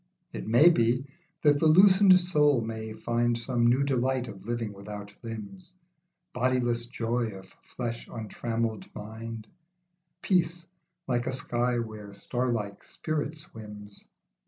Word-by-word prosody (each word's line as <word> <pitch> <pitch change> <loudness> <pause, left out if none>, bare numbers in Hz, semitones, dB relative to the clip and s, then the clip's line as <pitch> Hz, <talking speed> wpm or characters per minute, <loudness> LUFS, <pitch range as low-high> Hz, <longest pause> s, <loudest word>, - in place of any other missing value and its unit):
It - - -6
may 120 +10 +7
be, 125 -4 +2 0.4
that 145 -1 +5
the 160 - +4
loosened 190 +3 +7
soul 150 -7 +3
may 110 -1 -5
find 120 +1 0
Some 120 0 +1
new 125 +3 +4
delight 130 -2 0
of 95 0 -10
living 115 -3 -2
without 105 +1 -8
limbs, 120 - -8 0.6
Bodiless 120 -1 +1
joy 120 0 -1
of 95 0 -15
flesh 120 -2 -5
untrammelled 115 0 -3
mind, 110 +1 -7 0.8
Peace 170 -2 +1 0.4
like 120 -2 -1
a - - -1
sky 120 -1 0
where 110 -3 -6
starlike 115 -2 -2
spirit 155 -1 -3
swims. 105 -8 -9
120 Hz, 125 wpm, -28 LUFS, 110-140 Hz, 0.8 s, may